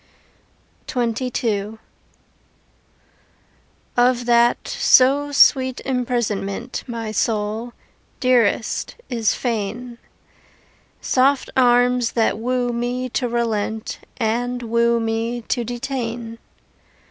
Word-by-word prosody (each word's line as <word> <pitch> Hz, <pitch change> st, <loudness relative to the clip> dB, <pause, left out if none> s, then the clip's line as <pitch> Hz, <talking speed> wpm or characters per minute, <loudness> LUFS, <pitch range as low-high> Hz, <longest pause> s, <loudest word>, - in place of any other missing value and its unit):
XXII 230 Hz, -3 st, -1 dB, 2.2 s
Of 245 Hz, 0 st, +3 dB
that 240 Hz, 0 st, +3 dB
so 280 Hz, +3 st, +4 dB
sweet 260 Hz, -2 st, +4 dB
imprisonment 240 Hz, -3 st, -2 dB
My 230 Hz, -3 st, -4 dB
soul, 215 Hz, +2 st, -1 dB, 0.5 s
dearest, 240 Hz, -3 st, +1 dB, 0.2 s
is 230 Hz, -3 st, +1 dB
fain 235 Hz, +1 st, -3 dB, 1.0 s
Soft 270 Hz, +1 st, +2 dB
arms 245 Hz, -1 st, +3 dB
that 225 Hz, -2 st, +1 dB
woo 245 Hz, +1 st, -1 dB
me 245 Hz, +2 st, -2 dB
to 250 Hz, +1 st, -1 dB
relent 220 Hz, -2 st, -2 dB, 0.2 s
And 245 Hz, +2 st, -1 dB
woo 235 Hz, +1 st, +2 dB
me 225 Hz, +1 st, -2 dB
to 240 Hz, -, 0 dB
detain. 235 Hz, -1 st, -4 dB
240 Hz, 80 wpm, -21 LUFS, 225-250 Hz, 2.2 s, so